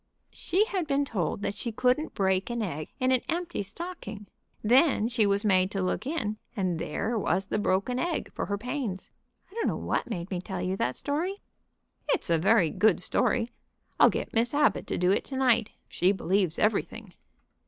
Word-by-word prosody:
"She 380 Hz, +5 st, +1 dB
had 380 Hz, -8 st, -2 dB
been 285 Hz, 0 st, +1 dB
told 200 Hz, -4 st, -2 dB
she 230 Hz, +3 st, -3 dB
couldn't 250 Hz, +7 st, +1 dB
break 190 Hz, 0 st, +1 dB
an 235 Hz, -1 st, -2 dB
egg 155 Hz, -6 st, -4 dB
in 255 Hz, 0 st, +2 dB
an 255 Hz, -2 st, +3 dB
empty 345 Hz, -6 st, -2 dB
stocking. 210 Hz, -, -7 dB, 0.4 s
Then 245 Hz, 0 st, +4 dB
she 235 Hz, -3 st, +2 dB
was 200 Hz, +2 st, +1 dB
made 185 Hz, -2 st, +4 dB
to 195 Hz, -2 st, -2 dB
look 185 Hz, +7 st, -2 dB
in, 225 Hz, -9 st, -2 dB, 0.2 s
and 185 Hz, -5 st, -1 dB
there 220 Hz, +11 st, -2 dB
was 195 Hz, -1 st, +1 dB
the 205 Hz, -, -1 dB
broken 205 Hz, +6 st, 0 dB
egg 340 Hz, +2 st, -2 dB
for -, -, -3 dB
her 200 Hz, -, -1 dB
pains. 235 Hz, -4 st, -4 dB, 0.4 s
I -, -, -17 dB
don't 460 Hz, -, -1 dB
know -, -, 0 dB
what -, -, -2 dB
made 185 Hz, -4 st, -4 dB
me 180 Hz, -2 st, -2 dB
tell 190 Hz, 0 st, -5 dB
you 185 Hz, +1 st, -1 dB
that 125 Hz, -6 st, 0 dB
story." 330 Hz, +7 st, -2 dB, 0.7 s
"It's -, -, 0 dB
a 165 Hz, -, +4 dB
very 190 Hz, -3 st, +4 dB
good 215 Hz, -4 st, +3 dB
story. 230 Hz, +5 st, 0 dB, 0.5 s
I'll -, -, +8 dB
get -, -, -4 dB
Miss 235 Hz, +4 st, +2 dB
Abbott 295 Hz, 0 st, +2 dB
to -, -, -2 dB
do 180 Hz, +1 st, +3 dB
it 200 Hz, -, +1 dB
to 265 Hz, -, -5 dB
night. 240 Hz, -4 st, +3 dB, 0.2 s
She 180 Hz, +2 st, +2 dB
believes 190 Hz, -3 st, 0 dB
everything." 215 Hz, -1 st, -1 dB
215 Hz, 190 wpm, -28 LUFS, 190-260 Hz, 0.7 s, I'll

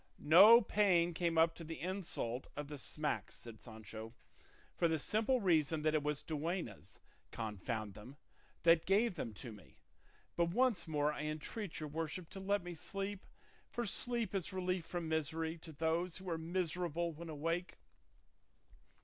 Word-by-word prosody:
"No 205 Hz, +10 st, +9 dB
pain 180 Hz, -5 st, +3 dB
came 170 Hz, -1 st, 0 dB
up 165 Hz, +1 st, +5 dB
to 165 Hz, -, -9 dB
the 165 Hz, 0 st, -6 dB
insult 170 Hz, -9 st, -3 dB
of 145 Hz, -1 st, -4 dB
the 145 Hz, -2 st, -6 dB
smacks," 150 Hz, +3 st, -2 dB
said 115 Hz, -2 st, -10 dB
Sancho, 110 Hz, 0 st, -9 dB, 0.6 s
"for 170 Hz, -, +3 dB
the 160 Hz, -1 st, +1 dB
simple 220 Hz, -, +2 dB
reason 160 Hz, -6 st, +2 dB
that 155 Hz, 0 st, +3 dB
it 155 Hz, -, +3 dB
was 150 Hz, 0 st, -1 dB
duennas, 160 Hz, -, -4 dB, 0.3 s
confound 110 Hz, -1 st, -4 dB
them, 125 Hz, +8 st, -11 dB, 0.5 s
that 165 Hz, -1 st, +5 dB
gave 205 Hz, +3 st, +4 dB
them 135 Hz, -9 st, -4 dB
to 120 Hz, +3 st, -8 dB
me; 105 Hz, -3 st, -15 dB, 0.6 s
but 170 Hz, -, +3 dB
once 205 Hz, 0 st, +2 dB
more 150 Hz, -1 st, +1 dB
I 150 Hz, -, -4 dB
entreat 155 Hz, +6 st, -4 dB
your 155 Hz, -1 st, -4 dB
worship 160 Hz, +3 st, -4 dB
to 195 Hz, -, -7 dB
let 200 Hz, 0 st, 0 dB
me 175 Hz, 0 st, -6 dB
sleep, 195 Hz, +4 st, -4 dB, 0.4 s
for 240 Hz, -, -2 dB
sleep 235 Hz, 0 st, 0 dB
is 190 Hz, -4 st, -2 dB
relief 185 Hz, -2 st, -1 dB
from 175 Hz, -2 st, -3 dB
misery 160 Hz, +1 st, -1 dB
to 160 Hz, 0 st, -10 dB
those 165 Hz, +3 st, -1 dB
who 190 Hz, 0 st, -10 dB
are 165 Hz, -, 0 dB
miserable 170 Hz, 0 st, -1 dB
when 165 Hz, +2 st, -8 dB
awake." 165 Hz, +4 st, -2 dB
165 Hz, 160 wpm, -36 LUFS, 150-185 Hz, 0.6 s, No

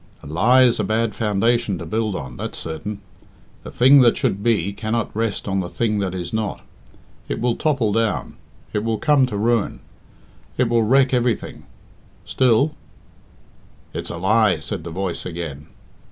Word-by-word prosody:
"A -, -, -12 dB
lie 110 Hz, -, +4 dB
is 120 Hz, -3 st, +3 dB
a -, -, +1 dB
bad 110 Hz, +1 st, 0 dB
foundation 105 Hz, -1 st, 0 dB
to 85 Hz, -, -7 dB
build 110 Hz, +3 st, -1 dB
on 65 Hz, -6 st, -6 dB
that's -, -, -5 dB
certain. 90 Hz, +6 st, -6 dB, 0.6 s
The -, -, -9 dB
thing 135 Hz, +3 st, +6 dB
that 120 Hz, -2 st, +4 dB
should 100 Hz, -, -1 dB
be 100 Hz, -4 st, +1 dB
cannot 110 Hz, +2 st, -3 dB
rest 110 Hz, -2 st, -2 dB
on 95 Hz, -1 st, 0 dB
the 90 Hz, -2 st, -3 dB
thing 110 Hz, -3 st, -1 dB
that 95 Hz, -2 st, -2 dB
is 90 Hz, 0 st, -5 dB
not. 110 Hz, -2 st, -2 dB, 0.7 s
It -, -, -2 dB
will 120 Hz, 0 st, +1 dB
topple 140 Hz, -9 st, 0 dB
down; 115 Hz, +1 st, -1 dB, 0.4 s
it 105 Hz, -, -1 dB
will 115 Hz, -1 st, -1 dB
come 135 Hz, +3 st, +3 dB
to 105 Hz, -5 st, -4 dB
ruin; 115 Hz, +1 st, 0 dB, 0.8 s
it 125 Hz, -2 st, +2 dB
will 115 Hz, -1 st, +3 dB
wreck 130 Hz, +4 st, +3 dB
everything. 120 Hz, -2 st, -1 dB, 0.6 s
Still 130 Hz, +4 st, +2 dB, 0.6 s
" -, -, -30 dB
"It -, -, -4 dB
is -, -, -5 dB
a -, -, -5 dB
lie," 105 Hz, +1 st, +3 dB
said 80 Hz, +3 st, -5 dB
the -, -, -5 dB
voice 90 Hz, +1 st, -3 dB
again. 80 Hz, -5 st, -6 dB
110 Hz, 175 wpm, -21 LUFS, 95-120 Hz, 0.8 s, thing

